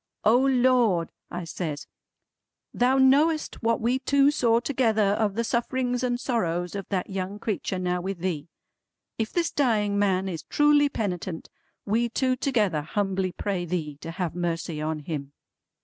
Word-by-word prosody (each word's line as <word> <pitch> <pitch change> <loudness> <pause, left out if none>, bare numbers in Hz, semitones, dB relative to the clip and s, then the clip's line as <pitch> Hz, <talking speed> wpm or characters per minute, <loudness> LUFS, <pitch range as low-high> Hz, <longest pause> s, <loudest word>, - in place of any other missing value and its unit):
"O 220 +2 +5
Lord" 250 -9 +3 0.2
I 175 0 -5
says 160 -3 -5 0.9
"Thou 255 +2 +3
knowest 295 +4 +3
what 230 -1 +1
we 240 +3 +1
two 280 +1 +3
saw 235 -5 +3
together 225 -6 +1
of 205 -2 0
the 230 - 0
sufferings 245 +1 -1
and 245 -1 0
sorrows 175 -9 -1
of 200 -2 -6
that 195 0 -2
young 190 +1 -3
creetur 210 -3 -3
now 180 -1 -1
with 190 +1 -4
Thee. 170 -3 -3 0.7
If 220 -1 -1
this 340 -1 0
dying 210 -7 +1
man 195 -2 +1
is 170 -4 -4
truly 295 -1 +3
penitent, 180 -8 -4 0.3
we 230 +3 +1
two 255 +2 +1
together 215 - +1
humbly 190 +3 -1
pray 190 0 -3
Thee 160 -4 -3
to 165 - -6
have 175 -1 -3
mercy 165 -2 -3
on 155 0 -2
him!" 145 -3 -5
205 Hz, 155 wpm, -26 LUFS, 175-250 Hz, 0.9 s, O